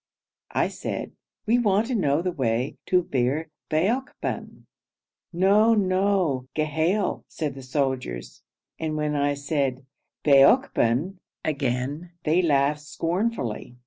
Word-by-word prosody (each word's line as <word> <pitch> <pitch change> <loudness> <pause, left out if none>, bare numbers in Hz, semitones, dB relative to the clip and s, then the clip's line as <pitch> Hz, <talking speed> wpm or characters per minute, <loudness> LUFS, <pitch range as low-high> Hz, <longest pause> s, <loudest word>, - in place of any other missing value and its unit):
I - - +3
said, - - -5 0.3
'We 235 +3 +3
want 210 -2 +2
to 250 +1 -2
know 155 -5 +1
the 180 - 0
way 125 -4 -1
to 180 -1 +3
Bir 140 +3 -1 0.2
Baokban.' 215 - -2 0.7
'No, 200 +6 +4
no! 185 -9 +1
Ghail,' 160 +6 0
said 150 -4 -4
the 135 - -9
soldiers, 130 - -3 0.4
and 155 -1 -2
when 150 -1 -1
I 145 0 +1
said 140 -2 -2 0.4
'Baokban!' 140 - +4 0.3
again 140 +4 -2
they 165 +4 +3
laughed 150 -2 +2
scornfully. 165 - -3
155 Hz, 110 wpm, -25 LUFS, 135-185 Hz, 0.7 s, No